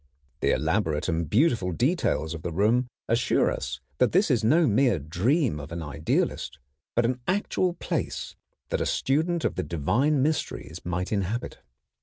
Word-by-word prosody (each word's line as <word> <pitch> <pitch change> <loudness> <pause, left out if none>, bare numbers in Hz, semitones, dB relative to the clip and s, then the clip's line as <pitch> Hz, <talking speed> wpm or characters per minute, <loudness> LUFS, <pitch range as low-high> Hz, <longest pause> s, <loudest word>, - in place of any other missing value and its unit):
The - - +1
elaborate 80 -2 +1
and 80 -3 -1
beautiful 115 - +2
details 120 - 0
of 80 - -6
the 85 - -4
room 110 +8 +2 0.2
assure 115 +1 +2
us 65 +2 -4 0.2
that 125 - +3
this 185 -2 +4
is 120 -3 +2
no 160 +10 +4
mere 125 +1 +3
dream 90 - 0
of 75 +2 -8
an 85 0 -4
idealist, 75 0 -1 0.4
but 120 - +3
an 125 +2 0
actual 185 -1 +1
place 170 - -3 0.3
that - - -1
a - - +1
student 160 +5 0
of - - +1
the 95 - -2
divine 115 - +1
mysteries 150 - -2
might 90 +1 -3
inhabit. 105 +3 -2
110 Hz, 160 wpm, -26 LUFS, 85-140 Hz, 0.4 s, this